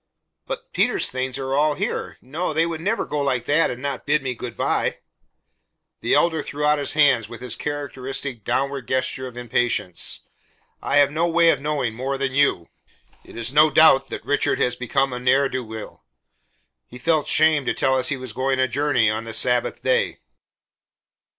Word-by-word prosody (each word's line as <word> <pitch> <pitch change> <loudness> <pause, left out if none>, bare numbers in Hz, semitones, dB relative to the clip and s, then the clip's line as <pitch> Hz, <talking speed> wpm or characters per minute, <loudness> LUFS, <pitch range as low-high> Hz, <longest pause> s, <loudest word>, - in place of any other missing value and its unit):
"But - - -7
Peter's - - +1
things 130 0 -3
are 135 0 -3
all 150 +1 +2
here. - - -3
No, 155 +5 -3
they 165 +1 +3
would 165 -1 -4
never 210 +6 -1
go 150 - -3
like 130 -4 -1
that 150 +5 +3
and 125 +2 -6
not 140 -1 -4
bid 150 0 +2
me 130 -1 -2
good 120 -1 -8
by." - - 0 1.0
The - - +1
Elder 160 -2 +2
threw 150 0 -4
out 150 0 +3
his 140 - -2
hands 140 -8 +3
with 115 - -9
his 125 -2 -4
characteristic 135 -4 -4
downward 140 +1 -2
gesture 130 0 -1
of 125 -1 -11
impatience. 120 -6 -1 0.6
"I - - +1
have 145 -1 +5
no 165 +3 0
way 170 0 +4
of 140 - -2
knowing, 140 -6 -1
more 135 +4 -3
than 135 -1 -2
you. 135 -11 +2 0.6
It - - -13
is 115 +2 -1
no 150 +1 +6
doubt 135 -2 +5
that - - -7
Richard 145 - +1
has 125 -1 +1
become 135 +2 0
a 125 - -4
ne'er 135 +3 +3
do 130 -1 -3
weel. 110 -1 -9 0.8
He 125 - -11
felt 155 +3 +1
shame 155 -3 +3
to - - +2
tell 130 - +2
us 130 - +1
he 145 - -1
was 130 -4 -8
going 130 +2 0
a 130 - +3
journey 135 -3 +1
on 110 +1 -1
the 115 - -7
Sabbath 125 +2 +1
day." 485 -1 +1
135 Hz, 190 wpm, -22 LUFS, 125-150 Hz, 1.0 s, no